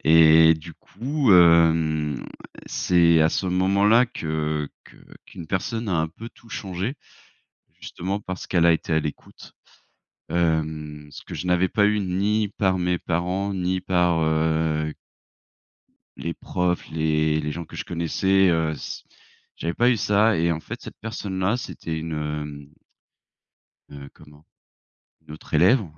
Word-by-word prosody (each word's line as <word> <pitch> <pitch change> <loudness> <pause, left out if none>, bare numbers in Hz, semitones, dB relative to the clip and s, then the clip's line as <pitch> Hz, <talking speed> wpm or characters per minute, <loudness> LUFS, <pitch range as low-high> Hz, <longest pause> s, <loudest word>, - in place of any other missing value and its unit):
Et 80 0 +7
du 80 +1 -11
coup, 135 -3 -1
hem, 80 -4 +4 0.4
c'est 85 -2 +3
à 80 - +4
ce 95 - -2
moment-là 100 +6 +3
que 75 -5 -3 0.2
que - - -18 0.3
qu'une 85 - -10
personne 110 +6 -3
a 90 - +1
un 80 0 0
peu 115 +8 -10
tout 115 - -21
changé, 95 +4 -4 0.9
justement 100 +3 -4
parce 95 -2 -7
qu'elle 85 -2 +2
a 85 - +6
été 80 0 -2
à 80 - +3
l'écoute, 75 -1 -8 0.8
hem, 80 -3 -1
ce - - -11
que - - -10
je 90 - -5
n'avais 90 +1 +2
pas 105 +1 +2
eu 105 0 +2
ni 100 +3 0
par 95 -2 0
mes 90 0 0
parents, 90 +4 -2
ni 95 0 -1
par, 90 -2 +1
heu 80 -1 0 1.2
les 85 0 -4
profs, 90 +1 -2
les 80 -1 +1
les 75 0 -3
gens 85 +2 -6
que - - -13
je - - -4
connaissais, 95 +3 +1
heu, 80 -2 +1
s 75 - -7 0.5
j'avais 85 0 -3
pas 120 +5 +3
eu 120 - +2
ça 105 -1 +2
et 85 +1 +1
en 80 - -2
fait, - - -8
cette - - -11
personne 100 -3 -5
là, 100 +6 +1
c'était 80 -8 -6
une 80 0 -5
hem 75 -1 -5 1.2
heu, 70 -1 -10
comment? 75 0 -18 0.8
Une 75 - -9
autre 75 - -14
élève 95 - +4
85 Hz, 150 wpm, -23 LUFS, 80-95 Hz, 1.2 s, Et